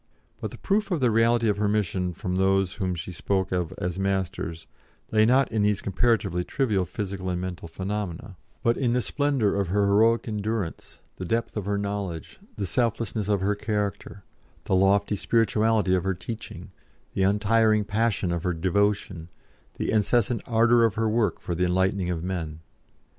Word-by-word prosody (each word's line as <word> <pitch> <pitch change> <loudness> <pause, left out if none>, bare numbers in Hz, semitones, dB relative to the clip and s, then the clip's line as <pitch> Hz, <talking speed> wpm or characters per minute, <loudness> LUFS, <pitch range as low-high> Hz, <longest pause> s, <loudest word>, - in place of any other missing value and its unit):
But - - -4
the - - -11
proof 210 +1 0
of 175 -5 0
the 125 -3 +3
reality 115 +1 +3
of 105 -1 +1
her 105 0 +1
mission 95 -3 0
from 90 - -4
those 95 0 +2
whom 95 -4 -2
she 85 +2 -6
spoke 95 +2 -1
of 90 -3 -1
as 90 +1 -3
Masters 95 -4 -2 0.5
lay 110 0 +4
not 130 +2 +3
in 110 -1 0
these 105 -1 +2
comparatively 100 -3 +1
trivial 105 -5 0
physical 95 0 -4
and 90 -1 -1
mental 90 -2 -5
phenomena, 95 +2 -5 0.3
but 115 0 +2
in 120 -4 +1
the 125 - +2
splendour 140 -8 +1
of 100 -2 0
her 100 +3 +2
heroic 110 +4 +3
endurance, 105 -3 -4 0.2
the - - -5
depth 115 +6 -1
of 105 -3 -3
her 100 0 0
knowledge, 100 -5 -4 0.2
the 100 - -2
selflessness 115 0 -1
of 100 -2 +1
her 100 +2 +2
character, 105 -1 -3 0.4
the - - -2
lofty 100 +2 +3
spirituality 110 -2 +2
of 90 - +2
her 95 -1 0
teaching, 110 +5 -8 0.4
the - - -1
untiring 105 +2 +3
passion 105 -3 0
of 85 -1 -1
her 90 0 -1
devotion, 95 -1 0 0.5
the - - -1
incessant 110 +1 +2
ardour 115 +1 +4
of 115 -4 +2
her 110 0 +1
work 110 -4 +1
for 85 - -4
the 90 +2 +1
enlightening 95 +1 +1
of 85 -2 -2
men. 80 -4 -4
100 Hz, 175 wpm, -26 LUFS, 95-110 Hz, 0.5 s, lay